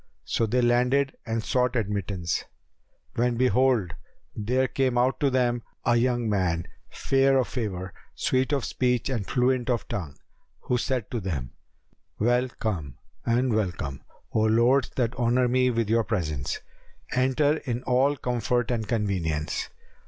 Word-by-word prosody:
So 115 Hz, -, 0 dB
they 125 Hz, +3 st, +1 dB
landed 125 Hz, +3 st, +2 dB
and 115 Hz, 0 st, -1 dB
sought 125 Hz, +1 st, +1 dB
admittance; 100 Hz, -5 st, -1 dB, 0.7 s
when 120 Hz, 0 st, +1 dB
behold, 125 Hz, -7 st, +2 dB, 0.4 s
there 125 Hz, +5 st, +1 dB
came 130 Hz, -2 st, 0 dB
out 125 Hz, +2 st, +2 dB
to 140 Hz, -, +3 dB
them 120 Hz, -2 st, +1 dB, 0.2 s
a 120 Hz, -, +4 dB
young 120 Hz, -1 st, +1 dB
man, 90 Hz, -5 st, 0 dB, 0.2 s
fair 135 Hz, 0 st, +2 dB
of 130 Hz, -, +2 dB
favour, 95 Hz, -7 st, -4 dB, 0.2 s
sweet 130 Hz, +2 st, +1 dB
of 140 Hz, -4 st, 0 dB
speech 125 Hz, -1 st, 0 dB
and 110 Hz, -7 st, -2 dB
fluent 125 Hz, -1 st, +1 dB
of 120 Hz, -5 st, 0 dB
tongue, 80 Hz, -8 st, -5 dB, 0.4 s
who 125 Hz, -, 0 dB
said 125 Hz, -4 st, -2 dB
to 120 Hz, -, -1 dB
them, 75 Hz, -, -4 dB, 0.7 s
"Well 120 Hz, +3 st, +2 dB
come 85 Hz, -, -4 dB, 0.3 s
and 120 Hz, +1 st, +2 dB
welcome, 85 Hz, -10 st, -2 dB, 0.3 s
O -, -, +2 dB
lords 115 Hz, +5 st, +3 dB
that 120 Hz, -2 st, 0 dB
honour 125 Hz, +1 st, +2 dB
me 125 Hz, +1 st, +3 dB
with 115 Hz, -3 st, 0 dB
your 115 Hz, +1 st, +3 dB
presence! 80 Hz, -, -2 dB, 0.5 s
Enter 135 Hz, +4 st, +2 dB
in 125 Hz, -4 st, -4 dB
all 135 Hz, +3 st, +2 dB
comfort 120 Hz, -1 st, 0 dB
and 110 Hz, -3 st, -1 dB
convenience!" 90 Hz, -9 st, -1 dB
120 Hz, 145 wpm, -26 LUFS, 105-130 Hz, 0.7 s, a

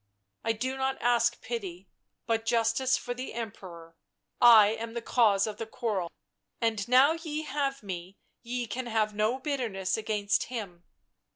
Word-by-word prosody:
" 100 Hz, 0 st, -52 dB
I 225 Hz, -, +1 dB
do 260 Hz, +4 st, -3 dB
not 265 Hz, 0 st, -1 dB
ask 240 Hz, 0 st, +2 dB
pity, 195 Hz, -6 st, -5 dB, 0.4 s
but 225 Hz, -1 st, 0 dB
justice 230 Hz, +3 st, +2 dB
for 245 Hz, -, -4 dB
the 255 Hz, -1 st, -7 dB
Emperor. 180 Hz, -7 st, -8 dB, 0.5 s
I 225 Hz, -4 st, +9 dB
am 225 Hz, +1 st, -5 dB
the 235 Hz, -, -2 dB
cause 210 Hz, -6 st, +3 dB
of 215 Hz, -1 st, -5 dB
the 225 Hz, -, -5 dB
quarrel, 210 Hz, -8 st, -2 dB, 0.5 s
and 220 Hz, -4 st, 0 dB
now 260 Hz, +4 st, +6 dB
ye 315 Hz, -2 st, -4 dB
have 275 Hz, -3 st, -2 dB
me 185 Hz, -1 st, -7 dB, 0.2 s
ye 245 Hz, 0 st, -3 dB
can 240 Hz, +3 st, -5 dB
have 220 Hz, -2 st, 0 dB
no 215 Hz, +4 st, +1 dB
bitterness 235 Hz, -10 st, -2 dB
against 215 Hz, -2 st, 0 dB
him." 195 Hz, -8 st, -7 dB
225 Hz, 160 wpm, -29 LUFS, 205-250 Hz, 0.5 s, I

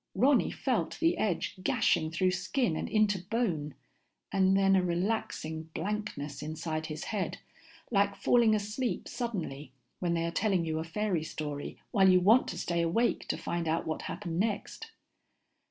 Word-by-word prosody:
Ronny 260 Hz, +7 st, +4 dB
felt -, -, -1 dB
the 335 Hz, +1 st, +3 dB
edge 195 Hz, -2 st, -1 dB
gashing 155 Hz, -3 st, +2 dB
through 185 Hz, +3 st, +1 dB
skin 185 Hz, -, 0 dB
and -, -, -3 dB
into 210 Hz, -3 st, +2 dB
bone, 180 Hz, -, -1 dB, 0.6 s
and 190 Hz, 0 st, +4 dB
then 195 Hz, 0 st, +4 dB
a 190 Hz, -, +4 dB
relaxing 170 Hz, -3 st, -2 dB
blankness 205 Hz, -10 st, -3 dB
inside 155 Hz, +1 st, -3 dB
his 155 Hz, 0 st, -5 dB
head, 205 Hz, -4 st, -2 dB, 0.5 s
like 200 Hz, -2 st, +2 dB
falling 225 Hz, +2 st, +4 dB
asleep 215 Hz, +4 st, -2 dB
suddenly 165 Hz, -, -4 dB, 0.3 s
when 175 Hz, -2 st, 0 dB
they 165 Hz, 0 st, 0 dB
are 170 Hz, -, -1 dB
telling 185 Hz, -1 st, +1 dB
you 160 Hz, -1 st, -1 dB
a -, -, -2 dB
fairy 175 Hz, 0 st, -1 dB
story 150 Hz, -2 st, -5 dB
while 195 Hz, -4 st, +5 dB
you 185 Hz, 0 st, +6 dB
want 220 Hz, +8 st, +5 dB
to -, -, -4 dB
stay 170 Hz, -1 st, 0 dB
awake 180 Hz, +9 st, +1 dB
to -, -, -1 dB
find 170 Hz, -1 st, -3 dB
out 160 Hz, +1 st, 0 dB
what 160 Hz, -, -3 dB
happened 170 Hz, 0 st, -4 dB
next. 210 Hz, 0 st, -2 dB
185 Hz, 160 wpm, -30 LUFS, 160-210 Hz, 0.6 s, you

